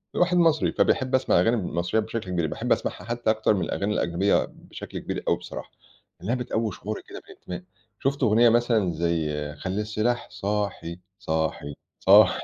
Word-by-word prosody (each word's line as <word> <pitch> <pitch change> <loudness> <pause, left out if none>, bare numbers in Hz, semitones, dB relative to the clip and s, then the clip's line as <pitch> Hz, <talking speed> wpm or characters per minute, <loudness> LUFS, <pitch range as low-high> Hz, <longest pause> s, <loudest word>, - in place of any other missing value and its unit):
الواحد 180 0 +3
مصري، 165 -3 +3
فبيحب 130 0 +2
أسمع 130 - +3
أغاني 115 +2 +3
المصرية 90 +1 0
بشكل 110 -3 -5
كبير، 85 -3 0
باحب - - -4
أسمعها - - 0
حتّى 120 -1 -1
أكتر 110 0 +3
من 95 - -1
الأغاني 100 +2 -1
الأجنبية 90 +3 +2
بشكل - - -9
كبير - - -4
أوي - - +3
بصراحة، - - -8 0.5
لإنها 110 +8 -1
بتقوي 115 -3 -1
شعورِك 105 +4 -6
كده - - -7
بالإنتماء، 90 0 -9 0.4
شُفت 140 +1 0
أغنية 115 +1 +5
مثلًا 115 -5 +2
زي 80 -1 0 0.2
خلّي 95 +7 -3
السلاح 110 +3 -1
صاحي، 100 -4 -3 0.2
صاحي، 80 -5 -2 0.3
صاحي. - - +6
105 Hz, 160 wpm, -25 LUFS, 90-120 Hz, 0.5 s, صاحي